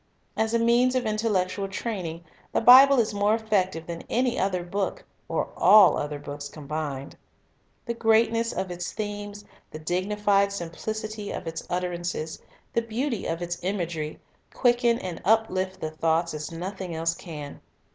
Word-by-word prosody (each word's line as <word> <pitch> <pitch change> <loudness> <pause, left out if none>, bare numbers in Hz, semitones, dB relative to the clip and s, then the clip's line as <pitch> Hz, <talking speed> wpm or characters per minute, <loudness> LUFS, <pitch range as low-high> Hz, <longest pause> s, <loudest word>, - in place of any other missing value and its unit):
As 220 +1 0
a - - +5
means 240 +2 +3
of 255 -2 +1
intellectual 205 -3 0
training, 185 -5 -4 0.3
the - - +3
Bible 265 +3 +8
is 215 -2 +1
more 205 +1 +2
effective 190 -7 0
than 170 0 -6
any 250 +1 +1
other 185 -2 0
book, 195 +3 -3 0.2
or - - -1
all 210 -3 +7
other 150 0 -3
books 145 0 -7
combined. 145 -2 -5 0.7
The 235 - -2
greatness 230 0 +2
of 185 0 -3
its 175 0 -5
themes, 205 -1 -5 0.2
the - - -8
dignified 200 +4 +1
simplicity 210 +4 -5
of - - -5
its 165 0 -4
utterances, 175 -3 -3 0.3
the 230 - +2
beauty 230 +1 -2
of 165 +1 -2
its 175 0 -4
imagery, 170 -5 -3 0.3
quicken 240 -2 +3
and 180 -6 -6
uplift 190 -3 +1
the 155 - -4
thoughts 165 +1 0
as 150 +1 -5
nothing 180 +1 -5
else 165 +1 0
can. 150 -5 -8
190 Hz, 150 wpm, -26 LUFS, 165-220 Hz, 0.7 s, Bible